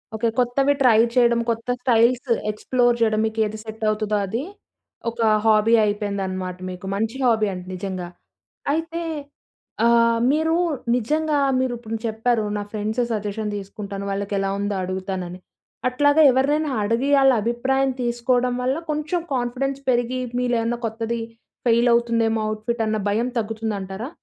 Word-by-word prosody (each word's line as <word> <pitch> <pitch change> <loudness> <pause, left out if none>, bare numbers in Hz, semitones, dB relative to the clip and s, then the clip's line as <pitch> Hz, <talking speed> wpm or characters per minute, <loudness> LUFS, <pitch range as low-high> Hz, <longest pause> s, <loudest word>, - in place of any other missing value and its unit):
Okay. 230 +2 0
కొత్తవి 270 +3 +2
try 230 -4 +6 0.2
చేయడం. 235 -1 +4
కొత్త 230 +1 -2
స్టైల్స్ 245 +1 +3 0.2
ఎక్స్‌ప్లో‌ర్ 240 +2 +1
చేయడం 215 -1 +3
మీకేది 220 -1 -1
సెట్ 220 0 -8
అవుతదో 215 0 -1
అది. 225 +7 -3 0.7
ఒక 235 - -11 0.3
హాబీ 220 +1 +4
అయిపోయిందనమాట 195 -3 -3
మీకు. 180 +1 -8
మంచి 225 +4 -2
హాబీ 220 -3 +3
అండి 180 0 -8
నిజంగా. 185 -1 -4 0.7
అయితే 330 +2 -2 0.8
ఆహ్, 230 0 +4
మీరు 320 +2 +1 0.4
నిజంగా 305 +5 0 0.2
మీరిప్పుడు 240 -3 -2
చెప్పారు 225 +1 0
నా - - -2
ఫ్రెండ్స్ 215 +2 -2
సజెషన్ 210 0 -2
తీసుకుంటాను, 200 0 -6
వాళ్ళకెలా 195 0 -1
ఉందో 205 0 -1
అడుగుతానని. 185 -1 -4 0.5
అట్లాగా 290 +4 +3
ఎవరినైనా 290 +4 +1
అడిగి 230 +6 0
ఆళ్ళ 270 0 +6
అభిప్రాయం 265 +3 +1
తీసుకోవడం 245 +1 +1
వల్ల 260 +4 0
కొంచెం 305 +4 -1
కాన్ఫిడెన్స్ 260 +2 -1
పెరిగి 245 +1 +1 0.2
మీలోయేమన్నా 240 -1 0
కొత్తది 225 +1 -3 0.5
ఫెయిలవుతుందేమో 235 -1 +3
అవుట్ 215 0 -4
ఫిట్ 235 -1 0
అన్న 215 0 0
భయం 230 +4 +1
తగ్గుతుందంటారా? 215 0 -4
230 Hz, 125 wpm, -22 LUFS, 210-250 Hz, 0.8 s, try